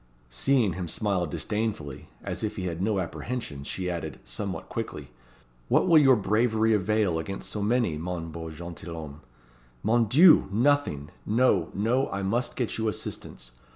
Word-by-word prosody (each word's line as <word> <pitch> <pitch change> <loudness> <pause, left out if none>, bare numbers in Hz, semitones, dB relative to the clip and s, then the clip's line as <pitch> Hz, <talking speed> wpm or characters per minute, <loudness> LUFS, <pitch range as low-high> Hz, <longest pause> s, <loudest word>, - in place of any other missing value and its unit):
Seeing 105 - +2
him 90 +1 -4
smile 95 -1 0
disdainfully, 100 -5 -3
as - - -4
if 105 - -2
he 95 - -4
had 85 -1 -3
no 105 +1 +1
apprehensions, 90 - -4
she 95 -1 -3
added, 80 -6 -4
somewhat 100 -3 -4
quickly 75 - -5 0.6
"What - - +3
will 165 -3 +7
your 135 -3 +6
bravery 110 +1 +2
avail 105 -4 +1
against 95 +4 -5
so 105 - -3
many, 105 -7 +1
mon 85 -1 -4
beau 80 0 -6
gentilhomme? 80 -2 -8 0.6
Mon 115 +2 +3
Dieu! 155 - +6
nothing. 115 - +1
No! 105 -6 +2
no! 120 +7 +1
I 100 0 -3
must 115 +6 -1
get 120 -3 -2
you 110 - 0
assistance. - - -5
100 Hz, 155 wpm, -27 LUFS, 85-115 Hz, 0.6 s, will